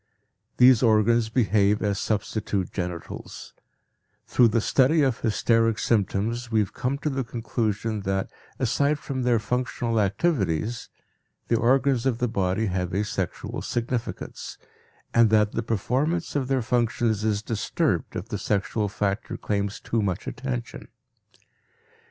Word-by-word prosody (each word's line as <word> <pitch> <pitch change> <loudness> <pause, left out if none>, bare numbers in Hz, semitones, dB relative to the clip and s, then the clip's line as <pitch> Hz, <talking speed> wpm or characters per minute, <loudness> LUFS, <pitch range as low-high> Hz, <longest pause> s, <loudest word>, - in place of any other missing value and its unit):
These 125 -2 +7
organs 115 0 +3
behave 105 -3 +2
as 100 -1 0
substitute 105 -3 -2
genitals; 90 -3 -6 0.7
through 125 - +4
the 115 +1 +2
study 140 +7 +3
of 130 -4 +1
hysteric 115 0 +2
symptoms 115 +3 0
we 110 - +3
have 100 -3 -1
come 130 +3 -1
to 150 +2 -2
the 135 0 -1
conclusion 115 -2 -2
that 95 0 -2 0.3
aside 140 +4 +1
from 135 -2 -4
their 120 -1 +3
functional 120 0 -1
activities, 105 - 0 0.6
the 115 - +3
organs 130 +1 +2
of 125 -3 +1
the 125 0 0
body 100 -1 0
have 90 -2 -2
a 100 - +1
sexual 95 -4 -4
significance, 120 0 -4 0.6
and 115 -1 +5
that 105 -1 +3
the 115 - -2
performance 130 - -1
of 135 -3 0
their 130 -2 +1
functions 115 -2 0
is 105 -1 0
disturbed 110 -2 -1
if - - -4
the - - -3
sexual 105 +1 -1
factor 100 +1 -2
claims 100 0 -2
too 115 - -1
much 95 -4 -2
attention. 60 -2 -5
115 Hz, 135 wpm, -25 LUFS, 105-125 Hz, 0.7 s, These